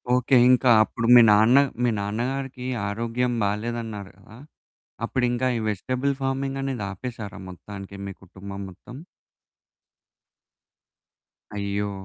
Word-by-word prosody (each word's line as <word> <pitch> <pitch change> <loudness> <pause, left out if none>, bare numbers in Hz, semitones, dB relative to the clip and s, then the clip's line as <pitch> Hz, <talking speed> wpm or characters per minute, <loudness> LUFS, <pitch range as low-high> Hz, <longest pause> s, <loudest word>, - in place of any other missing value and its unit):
Okay. 125 +1 +2
ఇంకా 125 0 +4
అప్పుడు 115 +1 -3
మీ 120 - +10
నాన్న 110 +5 +5 0.3
మీ 120 - +3
నాన్నగారికీ 125 +5 -3 0.2
ఆరోగ్యం 115 +3 -1
బాలేదన్నారు 105 -1 -3
గదా! 110 +3 -16 0.7
అప్పుడింకా 125 0 0
ఈ - - -3
వెజిటెబుల్ 130 +7 -1
ఫార్మింగనేది 135 -3 -2
ఆపేశారా 110 0 -7
మొత్తానికే 100 +2 -10
మీ 100 - -5
కుటుంబం 100 +2 -9
మొత్తం? 95 +7 -12 2.6
అయ్యో! 100 0 -2
115 Hz, 100 wpm, -24 LUFS, 100-125 Hz, 2.6 s, మీ